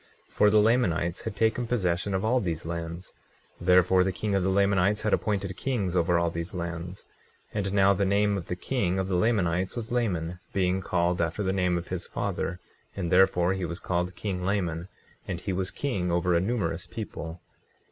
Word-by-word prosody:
24:2 - - -26
For 105 - +5
the 105 +1 +5
Lamanites 90 -8 +1
had - - -5
taken 110 +3 +1
possession 95 -4 0
of 95 +3 -1
all 125 +3 +3
these 85 -7 -3
lands; 85 +1 -5 0.5
therefore, 90 +1 +5
the 95 - 0
king 100 +3 -2
of 95 - +2
the 95 - +1
Lamanites 100 +1 +2
had 110 - +1
appointed 100 -4 0
kings 105 -9 -1
over 85 0 +3
all 85 0 +1
these 85 +5 -5
lands. 85 +1 -5 0.5
24:3 100 -2 -1
And 95 - -3
now 100 0 +5
the 100 +1 0
name 100 +1 +2
of 95 -4 -5
the 90 - -2
king 95 -2 -1
of 95 0 -1
the 95 - 0
Lamanites 90 -3 +1
was 120 -1 -5
Laman, 90 -8 -1
being 95 -1 +1
called 90 -1 0
after 85 +5 -1
the 95 0 0
name 90 -2 +1
of 85 - -6
his 90 -1 -4
father; 90 - -3 0.4
and 90 -4 -3
therefore 90 -1 +4
he 95 -1 -3
was 85 0 -4
called 90 0 -2
king 90 -1 -3
Laman. 90 -3 -1 0.4
And 90 -3 -3
he 95 +1 -3
was 95 0 -1
king 100 -11 -2
over 85 +1 +2
a 85 - +4
numerous 95 -5 -1
people. 90 -5 -6
95 Hz, 200 wpm, -27 LUFS, 85-100 Hz, 0.5 s, For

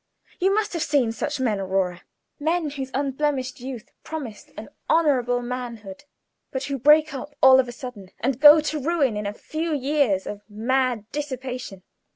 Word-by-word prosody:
You 380 +1 +3
must 420 0 0
have 335 - -2
seen 275 -7 +2
such 265 +6 -3
men, 225 -6 0
Aurora; 185 -2 -1 0.4
men 320 0 0
whose 270 -2 -5
unblemished 275 0 -1
youth 250 -3 -8
promised 270 -10 -7
an - - -8 0.2
honorable 250 -7 +2
manhood, 240 -2 -6 0.4
but 265 0 -4
who 275 -1 -3
break 300 +3 +5
up 285 +2 -7
all 265 0 +8
of 255 - +2
a - - -6
sudden, 240 -6 -9
and 260 +1 -1
go 295 +2 +9
to 305 0 -2
ruin 285 -6 +1
in 210 -1 -3
a - - -2
few 315 +4 -3
years 270 -8 +1
of 205 0 -6
mad 240 +1 0
dissipation. 255 -8 -5
260 Hz, 170 wpm, -24 LUFS, 235-295 Hz, 0.4 s, go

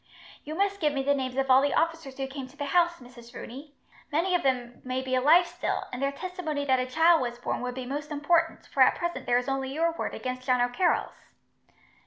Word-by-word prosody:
"You 305 +2 -6
must 400 +2 0
give 300 -4 +1
me 270 -1 -1
the 285 +1 +3
names 260 -2 -3
of 270 -1 +1
all 260 +1 +7
the 285 - +1
officers 325 -5 -1
who 270 - -2
came 270 -1 -7
to 270 +3 -19
the 285 - -3
house, 345 +4 +3
Mrs. 245 -1 -14
Rooney. 280 +4 -9 0.4
Many 340 +5 +1
of 355 - +3
them 245 -3 -1
may 255 0 -2
be 260 0 -4
alive 300 +8 +5
still, - - -3
and 250 - -4
their 275 0 +1
testimony 315 -2 -4
that 260 -2 +3
a 255 - -1
child 320 +4 +4
was 240 -1 -3
born 245 - -3
would 250 0 -4
be 255 -1 -5
most 290 +4 -4
important, 325 +3 +1
for - - -2
at - - +6
present 345 0 -4
there 245 0 +4
is 245 - -2
only 270 -1 -2
your 330 +4 +1
word 330 - -4
against 255 0 -5
John 250 -1 +3
O'Carroll's." 245 +9 0
275 Hz, 235 wpm, -27 LUFS, 255-325 Hz, 0.4 s, all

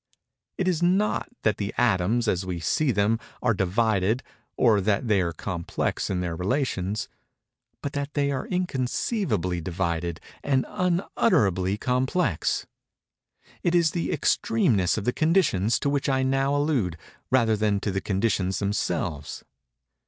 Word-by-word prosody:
It 185 - 0
is 175 -3 +1
not 190 +4 +1
that 110 - +2
the 100 -1 -4
atoms, 115 0 +2
as 95 -2 +1
we 90 -2 -4
see 130 - +1
them, 105 +1 +2 0.2
are - - +3
divided 105 +3 +1 0.3
or 110 -5 +4
that 105 +4 0
they 105 -3 +3
are 85 -2 -1
complex 85 0 -3
in 90 -2 -1
their 85 -2 -2
relations—but 110 - -4
that 140 +1 -4
they 140 -1 +1
are 130 -2 -3
inconceivably 130 - -1
divided 85 -1 -2 0.2
and 135 -2 +1
unutterably 145 - +1
complex:—it 125 - 0 1.1
is 170 -2 +4
the 170 - -2
extremeness 110 - +2
of 105 - -3
the 125 - +1
conditions 155 - +2
to - - -2
which 140 0 0
I 130 -1 +2
now 135 +1 +1
allude, 135 - 0 0.3
rather 115 -4 +3
than 105 -1 +1
to 105 - -1
the 95 +1 -2
conditions 95 -2 0
themselves. 90 -7 -2
110 Hz, 135 wpm, -25 LUFS, 95-140 Hz, 1.1 s, or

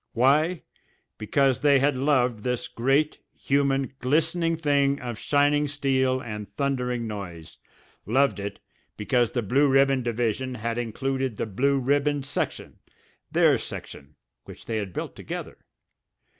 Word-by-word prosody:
Why? 150 +8 +2 0.6
Because 135 +4 +2
they 145 -2 +5
had 140 +1 +2
loved 125 -4 +1
this 125 +1 -2
great, 135 +6 +1 0.2
human, 135 -1 0
glistening 165 +5 +1
thing 140 -3 +2
of 120 -3 -6
shining 145 +1 +2
steel 130 -2 +1
and 105 -5 -7
thundering 125 0 -2
noise, 95 -7 -8 0.5
loved 135 +2 +2
it 100 0 -5 0.4
because 115 +3 +1
the 120 - -1
Blue 135 +8 +3
Ribbon 135 -1 +3
division 120 +2 -1
had 115 +1 -3
included 130 +1 -2
the - - -1
Blue 135 +7 +1
Ribbon 145 +2 +1
section, 145 - -4 0.5
their - - +4
section, 70 +2 -8 0.3
which - - -12
they 115 - -2
had 100 -3 -4
built - - -5
together. - - -7
130 Hz, 130 wpm, -25 LUFS, 115-140 Hz, 0.6 s, they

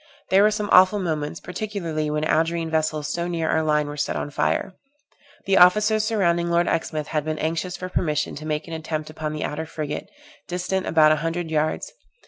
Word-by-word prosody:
There 190 +1 +6
were 210 - +6
some 210 -1 -3
awful 185 +3 +7
moments, 160 -4 -2
particularly 180 -6 -3
when 150 0 -1
Algerine 165 +1 0
vessels 155 -1 0
so 170 0 -2
near 165 -2 -2
our 160 - +2
line 150 -1 +1
were 145 0 -6
set - - -1
on 145 - -3
fire. 185 - 0 0.7
The 195 -1 +3
officers 210 +4 +5
surrounding 175 -6 +1
Lord 170 0 +2
Exmouth 155 -2 -2
had 150 -2 -1
been 155 0 -3
anxious 165 +3 -2
for 185 - -5
permission 150 -4 -1
to 155 +1 -7
make 150 +1 -2
an 165 - -7
attempt 155 -1 -4
upon 155 -1 -4
the 155 0 -4
outer 160 +2 -4
frigate, 150 -2 -5 0.4
distant 180 +1 -2
about 155 -1 +5
a 155 - +3
hundred 165 +1 -3
yards. 155 - -1
160 Hz, 195 wpm, -23 LUFS, 155-180 Hz, 0.7 s, awful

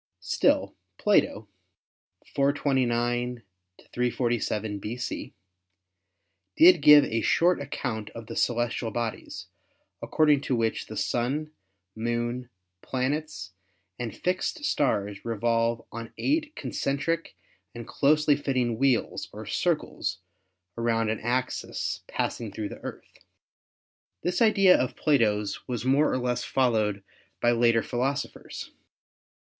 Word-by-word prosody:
Still, - - +1 0.2
Plato 105 0 +2 0.9
(429 125 -4 +1 0.5
347 120 -4 -1
B.C.) 115 +4 -5 1.2
did 175 -1 +8
give 150 0 +9
a 115 0 -1
short 175 +7 +3
account 115 -6 -4
of 115 - -7
the - - -8
celestial 120 -1 0
bodies, 115 0 -4 0.6
according 150 -3 +3
to 130 - -1
which 115 -1 -1
the - - -7
Sun, 140 +6 -1 0.4
Moon, 120 +2 -2 0.3
planets 130 - -3 0.5
and 120 -2 -5
fixed 185 - -1
stars 100 - 0
revolve 115 0 0
on 115 0 -7
eight 305 +1 0
concentric 145 +4 -2 0.4
and 120 -1 -7
closely 150 +3 +3
fitting 125 -5 -1
wheels 130 -4 +1
or - - -8
circles - - -1 0.6
around 115 -1 +1
an 110 - -3
axis 125 +3 -2
passing 115 -3 -3
through 105 0 -4
the - - -9
Earth. - - -9 1.0
This 180 +3 -1
idea 195 -4 +6
of 125 - 0
Plato's 105 -9 +1
was 125 -1 -3
more 140 +4 +3
or - - +1
less 125 -1 -1
followed 110 -6 +1 0.4
by 120 - +3
later 115 -1 +3
philosophers. 130 +3 -3
120 Hz, 105 wpm, -27 LUFS, 115-140 Hz, 1.2 s, give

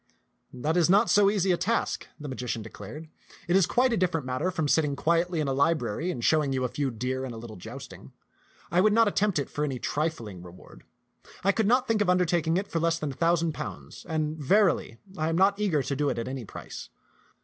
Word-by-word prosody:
*' - - -47
That 150 +7 -1
is 175 -1 +3
not 205 +5 +4
so 205 -1 +5
easy 195 -2 +1
a 175 - +2
task," 230 +6 -1
the 150 - -7
magician 125 -4 -4
declared. 150 +8 -9 0.4
It 175 - +2
is 195 -3 +5
quite 250 0 +2
a - - +1
different 170 -6 0
matter 130 +8 -1
from 165 -5 -1
sitting 145 -1 +2
quietly 170 +3 +1
in 150 - 0
a 135 - 0
library 150 0 0
and 125 -9 -4
showing 150 -4 +3
you 130 -1 -1
a - - +2
few 140 +1 -1
deer 130 +3 -3
and 125 -3 -5
a - - -8
little 110 -1 -9
joust 90 - -9
ing. - - -14 0.6
I 175 - +4
would 210 +1 +4
not 230 0 +5
attempt 205 -2 +1
it 140 - -1
for 150 - -3
any 135 -4 -2
trifling 120 - -3
reward. 90 0 -14 0.6
I 195 - +4
could 215 0 0
not 250 +3 +3
think 220 -2 +1
of 200 - +2
undertaking 175 -2 +2
it 195 - -1
for 165 - -2
less 165 0 +1
than 150 -3 -3
a - - -9
thou 170 +1 +3
sand 165 -1 -1
pounds; - - -8
and 155 -1 -1
verily, 175 - +2 0.2
I 155 +1 +1
am 165 - 0
not 200 +2 +3
eager 175 -9 +1
to 140 - -2
do 145 +1 +1
it - - -2
at 115 - -3
any 130 -2 -5
price." - - -9
160 Hz, 235 wpm, -27 LUFS, 135-185 Hz, 0.6 s, so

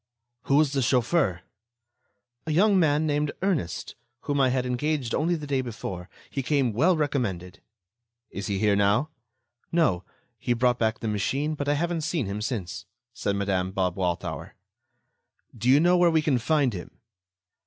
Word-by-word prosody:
"Who 140 - +2
was 150 -1 +3
the 135 - +1
chauffeur?" 120 - +1 1.1
"A - - 0
young 195 +4 +4
man 155 -2 +2
named 150 -1 0
Ernest, 175 - -1 0.3
whom 145 -1 0
I 130 - +4
had 125 0 0
engaged 125 0 -1
only 170 +3 +1
the 150 -3 -6
day 140 -2 0
before. 95 -7 -6 0.2
He 135 - -2
came 135 -3 +1
well 165 - +3
recommended." 110 - -2 0.7
"Is 100 - -5
he 100 -2 -1
here 105 0 +3
now?" 100 +9 +2 0.6
"No. 155 - +2 0.4
He 120 - 0
brought 125 +1 +1
back 110 0 0
the 115 - -3
machine, 135 +9 -1
but 145 -1 -3
I 145 - +3
haven't 170 +2 -1
seen 160 -4 -1
him 100 +2 -4
since," 105 -4 -4 0.3
said 100 - -2
Madame 95 -2 -1
Bob 90 -2 0
Walthour. 90 -3 -3 1.0
"Do 120 +2 -1
you 135 +3 +7
know 175 +3 +4
where 175 -1 +5
we 160 -2 +2
can 140 -5 +2
find 140 -1 +1
him?" 90 -2 -8
130 Hz, 165 wpm, -26 LUFS, 100-150 Hz, 1.1 s, you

